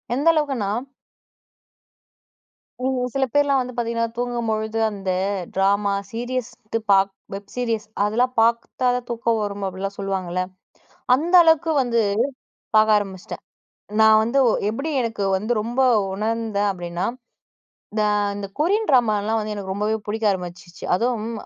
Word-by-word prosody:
எந்த 285 Hz, +5 st, 0 dB
அளவுக்குன்னா 270 Hz, -10 st, 0 dB, 2.1 s
ம். 255 Hz, -1 st, 0 dB
சில 270 Hz, -1 st, +2 dB
பேர்லாம் 285 Hz, -2 st, +3 dB
வந்து 250 Hz, 0 st, -5 dB
பாத்தீங்கன்னா 230 Hz, -1 st, 0 dB
தூங்கம்பொழுது, 225 Hz, -3 st, -2 dB
அந்த 195 Hz, -2 st, -4 dB, 0.4 s
ட்ராமா, 200 Hz, +1 st, +2 dB, 0.2 s
சீரியஸ் 245 Hz, +1 st, -3 dB, 0.2 s
து -, -, +4 dB
பாப் 195 Hz, 0 st, +4 dB, 0.2 s
வெப் 200 Hz, +1 st, -8 dB
சீரியஸ் 230 Hz, -3 st, -1 dB, 0.2 s
அதெல்லாம் 240 Hz, +5 st, +1 dB
பாத்தா 235 Hz, +2 st, +1 dB
தான் 250 Hz, -1 st, -3 dB
தூக்கம் 230 Hz, -1 st, 0 dB
வரும் 205 Hz, -1 st, -3 dB
அப்புட்லாம் 195 Hz, +1 st, -4 dB
சொல்லுவாங்கல்ல. 190 Hz, -2 st, -2 dB, 0.8 s
அந்த 325 Hz, +7 st, -3 dB
அளவுக்கு 320 Hz, 0 st, +4 dB
வந்து 240 Hz, -2 st, +1 dB, 0.8 s
பாக்க 215 Hz, 0 st, +6 dB
ஆரம்பிச்சிட்டேன். 195 Hz, -3 st, -6 dB, 0.6 s
நான் 220 Hz, 0 st, +7 dB
வந்து 235 Hz, +5 st, +1 dB, 0.3 s
எப்படி 275 Hz, +9 st, -3 dB
எனக்கு 225 Hz, -4 st, -2 dB
வந்து 215 Hz, +5 st, -3 dB
ரொம்ப 240 Hz, +4 st, -1 dB, 0.3 s
உணர்ந்தேன் 215 Hz, 0 st, -1 dB
அப்டீன்னா, 175 Hz, -1 st, -4 dB, 0.9 s
இந்த 215 Hz, 0 st, 0 dB, 0.3 s
இந்த 205 Hz, -1 st, -4 dB
கொரியன் 405 Hz, +8 st, +1 dB
ட்ராமாலாம் 225 Hz, -4 st, +2 dB
வந்து 215 Hz, 0 st, -4 dB
எனக்கு 195 Hz, -2 st, -5 dB
ரொம்பவே 210 Hz, +2 st, 0 dB
புடிக்க 220 Hz, +2 st, -3 dB
ஆரம்பிச்சிச்சு. 180 Hz, -1 st, -8 dB
அதுவும் 230 Hz, +2 st, -1 dB
220 Hz, 125 wpm, -22 LUFS, 200-245 Hz, 2.1 s, நான்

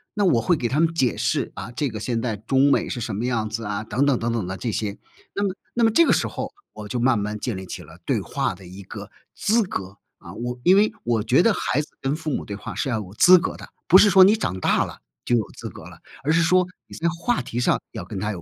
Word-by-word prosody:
那 205 Hz, -2 st, +2 dB
我 130 Hz, -11 st, +3 dB
会 170 Hz, +8 st, +2 dB
给 120 Hz, -, -1 dB
他 135 Hz, +6 st, 0 dB
们 165 Hz, 0 st, +2 dB
解 130 Hz, -7 st, +1 dB
释， -, -, -1 dB
啊， 100 Hz, +5 st, -7 dB
这 125 Hz, +4 st, -1 dB
个 110 Hz, -2 st, -6 dB
现 115 Hz, 0 st, -1 dB
在 115 Hz, -2 st, -2 dB
中 130 Hz, +7 st, +2 dB
美 -, -, +1 dB
是 120 Hz, -, -4 dB
什 110 Hz, -3 st, -3 dB
么 110 Hz, -, -3 dB
样 115 Hz, -4 st, -1 dB
子 115 Hz, +1 st, -4 dB
啊， 105 Hz, 0 st, -2 dB
等 130 Hz, +6 st, 0 dB
等 140 Hz, -4 st, +2 dB
等 115 Hz, 0 st, -1 dB
等 115 Hz, -5 st, -1 dB
的 95 Hz, +1 st, -4 dB
这 115 Hz, -, -3 dB
些， 105 Hz, -1 st, -3 dB, 0.4 s
那 200 Hz, -, +1 dB
么 190 Hz, -1 st, -2 dB, 0.2 s
那 235 Hz, -, +1 dB
么 225 Hz, -, +4 dB
这 335 Hz, +10 st, +5 dB
个 -, -, +3 dB
时 -, -, +1 dB
候， -, -, -5 dB, 0.2 s
我 105 Hz, -, -8 dB
就 120 Hz, +3 st, -3 dB
慢 125 Hz, -1 st, +3 dB
慢 105 Hz, +1 st, -3 dB
建 120 Hz, 0 st, -3 dB
立 95 Hz, -, -7 dB
起 -, -, -7 dB
了 -, -, -15 dB
对 -, -, +1 dB
话 -, -, -2 dB
的 90 Hz, -1 st, -14 dB
一 95 Hz, +3 st, -10 dB
个 -, -, -9 dB, 0.3 s
资 225 Hz, +2 st, +2 dB
格。 95 Hz, -, -6 dB, 0.2 s
啊， -, -, -11 dB
我 120 Hz, +1 st, -5 dB
因 185 Hz, -, +6 dB
为 210 Hz, +2 st, +4 dB
我 115 Hz, -3 st, +1 dB
觉 125 Hz, +8 st, +4 dB
得 230 Hz, -, +4 dB
孩 150 Hz, -, -1 dB
子 150 Hz, -, -10 dB
跟 135 Hz, +1 st, 0 dB
父 160 Hz, 0 st, -5 dB
母 -, -, -2 dB
对 100 Hz, -, -5 dB
话 -, -, -7 dB
是 135 Hz, -, -2 dB
要 120 Hz, -, 0 dB
有 100 Hz, -3 st, -7 dB
资 180 Hz, +9 st, +7 dB
格 -, -, -3 dB
的， -, -, -11 dB, 0.2 s
不 185 Hz, -, +8 dB
是 205 Hz, +2 st, +7 dB
说 190 Hz, -1 st, +8 dB
你 205 Hz, +3 st, +5 dB
长 95 Hz, -, -3 dB
大 -, -, +2 dB
了 -, -, -10 dB, 0.3 s
就 120 Hz, -, +2 dB
有 110 Hz, -, -1 dB
资 -, -, -6 dB
格 -, -, -12 dB
了， -, -, -13 dB, 0.3 s
而 155 Hz, -, +3 dB
是 165 Hz, +1 st, +4 dB
说 180 Hz, +2 st, +3 dB, 0.2 s
你 -, -, -11 dB
在 170 Hz, -, 0 dB
话 175 Hz, +9 st, -1 dB
题 120 Hz, -, -4 dB
上 -, -, +2 dB
要 110 Hz, -5 st, -5 dB
跟 100 Hz, -1 st, -6 dB
他 105 Hz, +2 st, -2 dB
有 90 Hz, -, -8 dB
120 Hz, 310 characters per minute, -23 LUFS, 105-170 Hz, 0.4 s, 不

